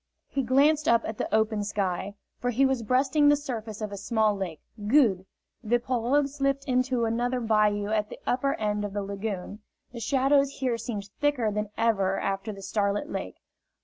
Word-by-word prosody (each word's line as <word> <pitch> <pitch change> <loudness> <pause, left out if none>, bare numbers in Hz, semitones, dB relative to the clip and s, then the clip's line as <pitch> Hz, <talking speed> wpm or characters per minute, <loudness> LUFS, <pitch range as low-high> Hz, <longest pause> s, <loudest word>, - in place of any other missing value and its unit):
He 275 - -1
glanced 290 +5 +3
up 230 0 +4
at 220 - -5
the - - -2
open 220 -1 +1
sky, 200 -1 -2 0.2
for 245 - -1
he 250 +3 +3
was 265 -2 +1
breasting 265 +5 +3
the 290 - +6
surface 230 -7 -5
of 210 -1 -3
a 200 - -5
small 220 0 +1
lake. 180 -6 -5 0.3
"Good!" 210 -8 +3 0.4
The 240 +2 +2
pirogue 250 +3 +1
slipped 275 -1 -1
into 255 -2 +1
another 240 +3 0
bayou 210 -2 +2
at 215 -1 0
the - - -8
upper 275 +2 +1
end 210 -1 -1
of 205 -1 -4
the 205 -1 -2
lagoon. 200 0 -5 0.3
The 235 - -7
shadows 275 +3 +2
here 250 -3 -1
seemed 205 -5 -5
thicker 285 -7 +1
than 210 0 -2
ever 200 -4 +1
after 195 +2 -2
the 195 -1 -10
starlit 205 +8 -1
lake. - - -4
225 Hz, 180 wpm, -27 LUFS, 205-260 Hz, 0.4 s, the